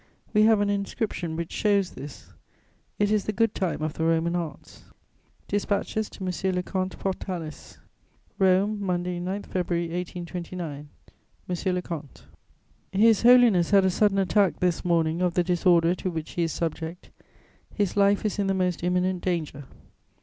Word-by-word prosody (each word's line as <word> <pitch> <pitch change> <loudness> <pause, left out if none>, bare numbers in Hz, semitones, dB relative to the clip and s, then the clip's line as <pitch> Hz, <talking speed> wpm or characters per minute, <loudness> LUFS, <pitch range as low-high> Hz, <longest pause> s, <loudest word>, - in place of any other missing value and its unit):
We 210 - +4
have 220 -2 +5
an 205 - +1
inscription 200 -4 -3
which 170 0 -4
shows 200 -3 +1
this: 140 +1 -11 0.6
it 205 0 +1
is 210 -2 +1
the - - 0
good 225 +1 +1
time 175 -5 -2
of 155 -1 -2
the 160 - -3
Roman 165 +1 +1
arts." 170 -4 -6 0.6
DISPATCHES 205 +1 -1
TO 190 - -8
M. 185 +1 -1
LE 180 - -1
COMTE 185 0 -3
PORTALIS 180 -5 -5 0.6
"ROME, 195 +2 +2
Monday, 180 -1 -1
9 190 +3 -3
February 175 -2 -2
1829. 170 -3 -6 0.6
"MONSIEUR 180 +1 -1
LE 180 - -1
COMTE, 155 -6 -8 0.7
"His 215 +2 +4
Holiness 235 -8 +6
had 195 -2 +5
a 190 - +3
sudden 205 +1 +2
attack 195 0 +2
this 180 -2 0
morning 165 -1 +1
of 180 -2 +1
the 180 - +3
disorder 175 -1 +3
to 185 - -3
which 160 -3 -5
he 175 - -2
is 165 -1 0
subject; 165 +1 -4 0.6
his 205 -4 -1
life 200 +1 +3
is 210 0 -1
in 200 - +1
the 195 - +1
most 180 -2 0
imminent 180 0 0
danger. 165 -5 -2
180 Hz, 160 wpm, -26 LUFS, 170-200 Hz, 0.7 s, Holiness